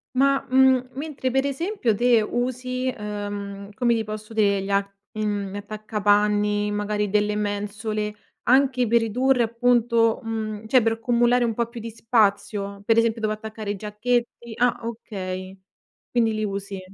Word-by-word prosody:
Ma, 275 Hz, +1 st, +3 dB
mhmm, 260 Hz, -1 st, +4 dB
mentre 275 Hz, -2 st, -3 dB
per 270 Hz, +2 st, +1 dB
esempio, 280 Hz, -, 0 dB
te 240 Hz, 0 st, +4 dB
usi, 255 Hz, +2 st, -2 dB
uhm, 205 Hz, -1 st, -5 dB
come 235 Hz, +2 st, +2 dB
ti 225 Hz, -1 st, 0 dB
posso 215 Hz, +1 st, -7 dB
dire 200 Hz, -3 st, +2 dB
gli, 195 Hz, -, -6 dB
a 200 Hz, 0 st, +3 dB, 0.3 s
mhmm, 205 Hz, -2 st, -2 dB
gli -, -, -4 dB
attaccapanni, 210 Hz, 0 st, +1 dB
magari 210 Hz, 0 st, -1 dB
delle 210 Hz, +1 st, +1 dB
mensole, 210 Hz, +1 st, -3 dB, 0.3 s
anche 260 Hz, -1 st, +3 dB
per 235 Hz, +2 st, +4 dB
ridurre 250 Hz, +3 st, +2 dB
appunto 235 Hz, 0 st, +2 dB
mhmm, 220 Hz, -1 st, -4 dB
cioè 250 Hz, +3 st, +4 dB
per 225 Hz, 0 st, +2 dB
accumulare 240 Hz, +1 st, +2 dB
un 230 Hz, -2 st, 0 dB
po' 235 Hz, +1 st, -1 dB
più 235 Hz, 0 st, -9 dB
di 230 Hz, +1 st, -6 dB
spazio? 205 Hz, -3 st, 0 dB
Per 225 Hz, -, +3 dB
esempio 230 Hz, 0 st, +2 dB
dove 215 Hz, -1 st, 0 dB
attaccare 215 Hz, -1 st, -6 dB
i -, -, -3 dB
giacchetti 235 Hz, +3 st, -2 dB
ah, 245 Hz, +1 st, +2 dB
okay, 190 Hz, -5 st, -6 dB, 0.5 s
quindi 230 Hz, -2 st, +2 dB
li 215 Hz, 0 st, -1 dB
usi. 200 Hz, -1 st, -5 dB
220 Hz, 155 wpm, -24 LUFS, 205-240 Hz, 0.5 s, mhmm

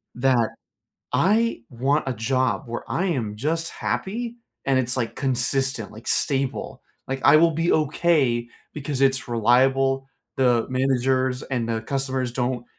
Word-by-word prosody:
that 125 Hz, -2 st, +2 dB, 0.6 s
I 215 Hz, -, +2 dB
want 135 Hz, +5 st, 0 dB
a -, -, 0 dB
job 120 Hz, -1 st, 0 dB
where 120 Hz, 0 st, -5 dB
I 190 Hz, -, 0 dB
am 115 Hz, -, -2 dB
just 165 Hz, +7 st, -1 dB
happy 235 Hz, +4 st, -3 dB, 0.3 s
and 135 Hz, -1 st, +3 dB
it's, 125 Hz, 0 st, 0 dB
like, 120 Hz, -3 st, -2 dB
consistent, 130 Hz, -2 st, 0 dB
like, 110 Hz, +3 st, -13 dB
stable. 135 Hz, -2 st, -1 dB, 0.2 s
Like, 135 Hz, 0 st, -3 dB
I -, -, +8 dB
will 165 Hz, +2 st, +5 dB
be 165 Hz, +2 st, 0 dB
okay 145 Hz, -6 st, +2 dB, 0.2 s
because 145 Hz, -2 st, -4 dB
it's 135 Hz, -2 st, +2 dB
reliable, 135 Hz, +3 st, +2 dB, 0.3 s
the 125 Hz, -3 st, +3 dB
managers 130 Hz, 0 st, +1 dB
and 120 Hz, -3 st, -2 dB
the 115 Hz, -1 st, -1 dB
customers 130 Hz, -1 st, -2 dB
don't 125 Hz, -1 st, -2 dB
130 Hz, 140 wpm, -24 LUFS, 120-140 Hz, 0.6 s, I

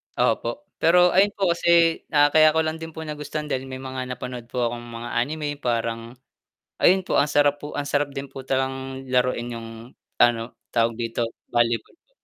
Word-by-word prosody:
Opo, 120 Hz, 0 st, 0 dB, 0.2 s
pero 180 Hz, +2 st, +5 dB
ayun 200 Hz, +2 st, +4 dB
po 190 Hz, -3 st, +1 dB
kasi 170 Hz, -1 st, +3 dB
na 145 Hz, -1 st, +4 dB
kaya 155 Hz, 0 st, +6 dB
ko 160 Hz, -, +3 dB
lang 160 Hz, +1 st, -3 dB
din 160 Hz, -1 st, -8 dB
po 160 Hz, -, -5 dB
nagustuhan 150 Hz, 0 st, -5 dB
dahil 130 Hz, 0 st, -2 dB
may 130 Hz, 0 st, -7 dB
mga 130 Hz, -1 st, -5 dB
napanood 125 Hz, -1 st, -7 dB
po 125 Hz, 0 st, -2 dB
akong 120 Hz, 0 st, -7 dB
mga 115 Hz, 0 st, -7 dB
anime 145 Hz, +2 st, -2 dB
parang 115 Hz, -1 st, -2 dB, 0.6 s
ayun 190 Hz, +2 st, +4 dB
po, -, -, -1 dB
ang -, -, +4 dB
sarap 145 Hz, 0 st, +3 dB
po 145 Hz, 0 st, -8 dB
ang 145 Hz, 0 st, -3 dB
sarap 145 Hz, -1 st, 0 dB
din 135 Hz, -1 st, -6 dB
po 135 Hz, -1 st, -9 dB
talagang 135 Hz, 0 st, -2 dB
laruin 125 Hz, -1 st, +1 dB
'yung 115 Hz, -1 st, -7 dB, 0.5 s
ano, 115 Hz, 0 st, +3 dB, 0.2 s
tawag 115 Hz, 0 st, +2 dB
dito 115 Hz, 0 st, -2 dB, 0.3 s
volleyball 120 Hz, -, 0 dB
po. -, -, -44 dB
135 Hz, 185 wpm, -24 LUFS, 120-155 Hz, 0.6 s, kaya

